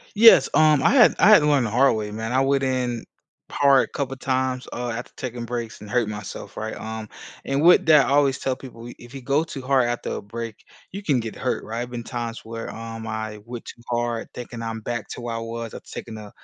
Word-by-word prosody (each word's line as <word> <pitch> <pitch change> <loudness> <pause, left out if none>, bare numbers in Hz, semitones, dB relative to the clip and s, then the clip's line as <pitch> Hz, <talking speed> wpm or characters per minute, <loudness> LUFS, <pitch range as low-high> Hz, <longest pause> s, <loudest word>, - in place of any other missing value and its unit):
Yes, 225 +2 +8
um, 155 -3 +5
I - - +5
had 250 -3 +6
I 205 - +6
had 210 -6 +9
to 150 - +1
learn 140 -4 +3
the 110 - -2
hard 125 0 +4
way, 105 -1 -3
man. 110 +2 -4
I 130 - +3
went 135 0 +2
in 125 -3 -1 0.5
hard 140 -2 +4
a - - -7
couple 135 -2 -2
times, 130 -1 -1
uh, 120 0 -3
after 115 +2 -5
taking 120 -2 -5
breaks 115 -3 -5
and 105 - -10
hurt 120 0 +1
myself, 105 -2 -7
right, 110 0 -4
um, 110 -1 -6 0.4
and 135 +2 0
with 175 -1 +6
that, 150 -3 +7
I - - -1
always 140 -2 +3
tell 130 - -1
people, 120 -4 -11
we 120 - -9
if 120 +3 -14
you 135 - -7
go 140 +5 +2
too 140 -5 -7
hard 130 -2 +2
after 120 - -3
a - - -6
break, 115 +1 -6 0.4
you 200 +2 -6
can 145 -9 +2
get 115 -1 -6
hurt, 130 - -2
right. 110 +1 -6
There - - -1
have 120 0 -5
been 120 -1 -5
times 120 -1 -5
where, 115 0 -6
um, 115 0 -7
I 110 -1 -4
went 120 -1 -7
too - - -11
hard, 120 -1 -2
thinking 120 -1 -7
I'm 115 0 -4
back 120 0 -4
to - - -7
where 115 -1 -3
I - - -3
was 115 0 -5
after - - -11
taking 110 -1 -7
a 105 -1 -10
120 Hz, 250 wpm, -23 LUFS, 115-135 Hz, 0.5 s, had